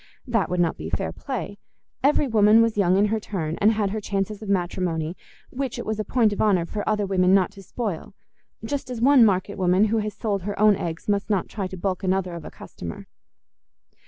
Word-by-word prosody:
That 230 Hz, -, 0 dB
would 180 Hz, -, -1 dB
not 170 Hz, -2 st, +1 dB
be -, -, -6 dB
fair -, -, -2 dB
play: 205 Hz, -, -6 dB, 0.4 s
every 285 Hz, +1 st, +3 dB
woman 220 Hz, -1 st, +5 dB
was 230 Hz, -1 st, 0 dB
young 190 Hz, -2 st, +3 dB
in 205 Hz, +1 st, +3 dB
her 220 Hz, -, +1 dB
turn, 165 Hz, -7 st, -4 dB
and 210 Hz, +2 st, +6 dB
had 210 Hz, -2 st, -1 dB
her 215 Hz, +1 st, -3 dB
chances 200 Hz, +1 st, -3 dB
of 215 Hz, -, -7 dB
matrimony, 175 Hz, -3 st, -1 dB, 0.4 s
which 265 Hz, -1 st, -3 dB
it -, -, -5 dB
was 220 Hz, 0 st, -3 dB
a -, -, 0 dB
point 220 Hz, 0 st, +2 dB
of -, -, -3 dB
honour 190 Hz, -5 st, +3 dB
for 205 Hz, +4 st, -4 dB
other 210 Hz, -1 st, +1 dB
women 190 Hz, -1 st, +3 dB
not 195 Hz, 0 st, +2 dB
to 200 Hz, -1 st, -13 dB
spoil—just 220 Hz, -, -6 dB
as 245 Hz, -2 st, -5 dB
one 265 Hz, +1 st, +6 dB
market 200 Hz, -1 st, +1 dB
woman 185 Hz, +2 st, +3 dB
who 225 Hz, -, +3 dB
has 210 Hz, 0 st, -4 dB
sold 205 Hz, -3 st, -2 dB
her 205 Hz, +3 st, -5 dB
own 210 Hz, -1 st, +6 dB
eggs 165 Hz, -2 st, -5 dB
must 205 Hz, 0 st, 0 dB
not 200 Hz, -4 st, 0 dB
try 200 Hz, -3 st, -4 dB
to 185 Hz, 0 st, -8 dB
balk 185 Hz, +1 st, -2 dB
another 185 Hz, -1 st, 0 dB
of 170 Hz, -2 st, -7 dB
a -, -, -6 dB
customer. 85 Hz, -1 st, -9 dB
200 Hz, 215 wpm, -24 LUFS, 185-215 Hz, 0.4 s, and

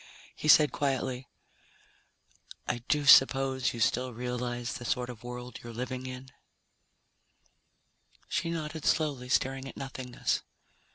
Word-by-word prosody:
He -, -, -4 dB
said 150 Hz, 0 st, +7 dB
quietly, 130 Hz, -2 st, -2 dB, 1.4 s
"I 120 Hz, -, -1 dB
do 150 Hz, -1 st, +1 dB
suppose 135 Hz, -1 st, +6 dB
you 120 Hz, -, -7 dB
still 125 Hz, +2 st, +1 dB
realize 120 Hz, 0 st, -3 dB
the -, -, -6 dB
sort 125 Hz, +1 st, -1 dB
of 120 Hz, -1 st, -13 dB
world 125 Hz, 0 st, -7 dB
you're 120 Hz, -, -7 dB
living 125 Hz, +2 st, -5 dB
in?" 130 Hz, +1 st, -8 dB, 2.0 s
She 165 Hz, -, -1 dB
nodded 160 Hz, -2 st, -4 dB
slowly, 140 Hz, -5 st, 0 dB
staring 135 Hz, +1 st, 0 dB
at -, -, -10 dB
nothingness. 130 Hz, -2 st, -3 dB
130 Hz, 120 wpm, -30 LUFS, 125-135 Hz, 2.0 s, said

